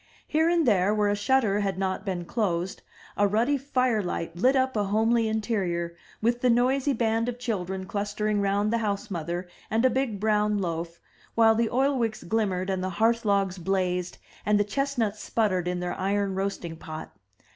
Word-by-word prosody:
Here 320 +1 +2
and 340 -2 +3
there, 205 -1 +3
where 210 -1 +2
a 205 - +2
shutter 210 -1 +2
had 195 -2 -1
not 190 0 -1
been 180 -2 -2
closed, 185 -3 -1 0.3
a 205 - +3
ruddy 230 +8 +2
fire 255 -5 +1
light 170 -2 -4
lit 255 +10 +3
up 260 -1 +1
a 210 -1 +1
homely 225 +3 +2
interior, 195 -6 -1 0.3
with 240 +2 +1
the 250 - +3
noisy 255 +4 +3
band 225 0 +1
of 245 - -5
children 190 -6 -3
clustering 205 +1 -1
round 200 +2 +1
the 235 - +2
house 205 -1 -2
mother 175 +1 -3 0.2
and 225 +3 +2
a 260 - +5
big 245 -5 -1
brown 210 0 +2
loaf, 170 -2 -3 0.4
while 225 -1 +6
the 225 0 +1
oilwicks 250 -4 0
glimmered, 190 -1 0
and 185 -1 -2
the 185 - -1
hearth 230 +1 +2
logs 195 -2 +1
blazed, 180 -1 -1 0.3
and 210 0 +3
the - - +4
chestnuts 225 -2 -1
sputtered 185 -6 0
in 180 0 -1
their 180 - -2
iron 200 +1 0
roasting 190 -4 -3
pot. 155 -1 -8
205 Hz, 180 wpm, -27 LUFS, 185-230 Hz, 0.4 s, while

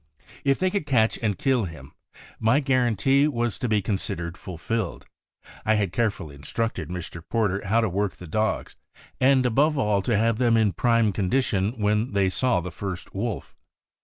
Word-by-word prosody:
If 135 -1 +3
they 185 0 +1
could 200 -7 -2
catch 115 -5 +2
and 105 -4 -1
kill 130 -6 +1
him, 75 -5 -10 0.5
my 115 +6 +3
guarantee 135 0 +2
was 120 -6 -1
to 125 - -1
be 105 -2 +2
considered 95 -4 -3
fulfilled, 95 +4 -4 0.6
I 110 - +3
had 100 -4 0
carefully 100 -9 -1
instructed 80 +4 -3
Mr. 90 -1 -6
Porter 105 -4 0
how 115 +4 +3
to 115 - +1
work 100 +1 -1
the 90 - -11
dogs, 110 +7 -1 0.4
and 130 0 +4
above 145 +6 +2
all 105 -6 +2
to 110 +2 +1
have 115 +1 +1
them 120 -2 +4
in 105 -3 +2
prime 115 -3 +2
condition 100 0 0
when 105 +2 0
they 100 -2 +2
saw 125 -4 +1
the 90 +1 -6
first 90 +1 -6
wolf. 105 +1 -4
110 Hz, 170 wpm, -25 LUFS, 95-120 Hz, 0.6 s, and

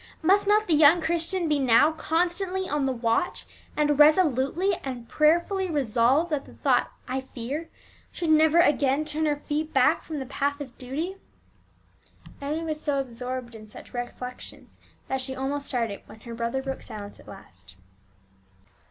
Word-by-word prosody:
Must 395 +4 +4
not 425 +1 +4
the 335 - +2
young 310 +3 +6
Christian 335 +2 -1
be 300 -2 +1
now 265 +4 +5
constantly 360 +4 -1
on 290 -4 0
the - - +1
watch, 235 +6 -1 0.3
and 295 -1 +2
resolutely 310 +3 +4
and 250 -3 -6
prayerfully 345 +7 +2
resolve 275 +2 +2
that 290 -2 -1
the - - -15
thought - - +1 0.2
"I 260 +1 -2
fear" 265 +5 -6 0.4
should 335 -2 -1
never 315 +1 +5
again 290 -3 +3
turn 310 +1 -1
her 295 - +2
feet 300 +2 -4
back - - +4
from 315 - -6
the 270 - -4
path 280 +2 -2
of 270 -4 -8
duty? 310 +10 -4 1.2
Emmie 300 +4 -2
was 310 -2 -3
so 285 -2 0
absorbed 250 -1 -5
in 215 -1 -11
such 210 - -13
reflections 250 +1 -7 0.3
that 265 0 -1
she 265 0 -4
almost 275 +2 -3
started 230 -6 -2
when 220 - -14
her 235 0 -8
brother 235 +3 -2
broke 270 0 -4
silence 205 -1 -9
at - - -17
last. 95 - -14
285 Hz, 160 wpm, -26 LUFS, 255-320 Hz, 1.2 s, young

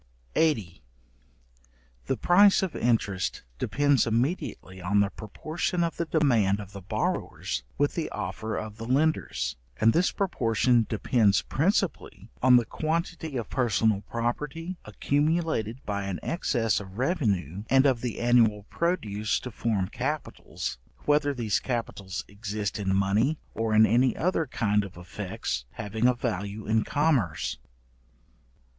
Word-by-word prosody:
§80. 110 - +1 1.3
The - - 0
price 195 +2 +5
of 185 -5 -3
interest 110 -6 0 0.2
depends 145 -3 +2
immediately 115 - -2
on 100 +3 +2
the 100 0 +2
proportion 155 - -3
of 170 - -2
the 170 - -1
demand 120 -12 +2
of 100 -2 -8
the 100 - -8
borrowers, 65 -7 -2 0.2
with - - +2
the - - -2
offer 110 0 -4
of 110 -1 -6
the 115 0 -6
lenders, 150 - 0 0.2
and 110 +1 +5
this 180 +2 +3
proportion 120 - +2
depends 105 - +2
principally 155 - -1
on 125 0 +7
the 120 -2 +5
quantity 160 +1 -2
of 115 - -5
personal 110 -4 +2
property, 150 +9 -3
accumulated 140 - 0
by 100 -1 -2
an 95 -2 -3
excess 115 - 0
of 95 -1 -10
revenue 105 - 0
and 135 +2 +5
of 130 -4 +3
the 120 -3 -3
annual 115 -4 +3
produce 110 - 0
to 125 - -6
form 105 -4 -1
capitals, - - -4 0.3
whether 145 0 +3
these 115 -6 0
capitals 105 -7 -4
exist 105 0 -4
in 95 -1 0
money 105 +10 +2 0.2
or 115 -1 0
in 110 +1 +7
any 120 +4 +3
other 165 -3 +1
kind 105 -4 +1
of 95 -3 -10
effects 90 - -4
having 110 +2 0
a 125 - +3
value 105 -3 -3
in 110 +1 +2
commerce. 135 - 0
115 Hz, 135 wpm, -27 LUFS, 100-145 Hz, 1.3 s, on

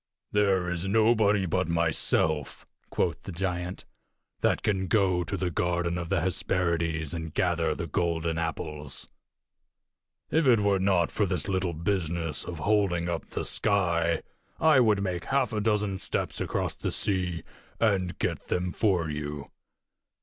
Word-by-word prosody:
"There 100 -3 +2
is 90 +1 -2
nobody 110 -2 +3
but 90 +1 0
myself," 80 -3 0 0.2
quoth 85 -2 -1
the - - -7
giant, 90 0 -3 0.5
"that - - +1
can 95 -2 0
go 95 -3 +2
to 100 - -3
the 90 -1 -1
garden 85 +1 0
of 85 -1 -5
the 95 -2 +1
Hesperides 85 -3 0
and 80 -2 -4
gather 85 -2 +1
the - - -4
golden 85 -1 -1
apples. 75 -3 -4 1.2
If 160 -2 +3
it 120 -4 +6
were 100 -1 +2
not 95 -3 +2
for 105 - +1
this 90 0 -2
little 95 -3 0
business 85 -2 -1
of 85 - -6
holding 90 -1 +1
up 85 -1 -3
the - - -4
sky, 85 -5 +2 0.4
I 155 -4 +6
would 105 -5 +3
make 90 -3 -2
half 135 -3 +1
a 105 - 0
dozen 105 -3 0
steps - - -2
across - - -1
the - - -3
sea 90 -4 -1 0.4
and 95 -5 +1
get - - -2
them 90 0 -1
for 90 -6 +1
you." 75 -1 -5
90 Hz, 150 wpm, -28 LUFS, 85-100 Hz, 1.2 s, it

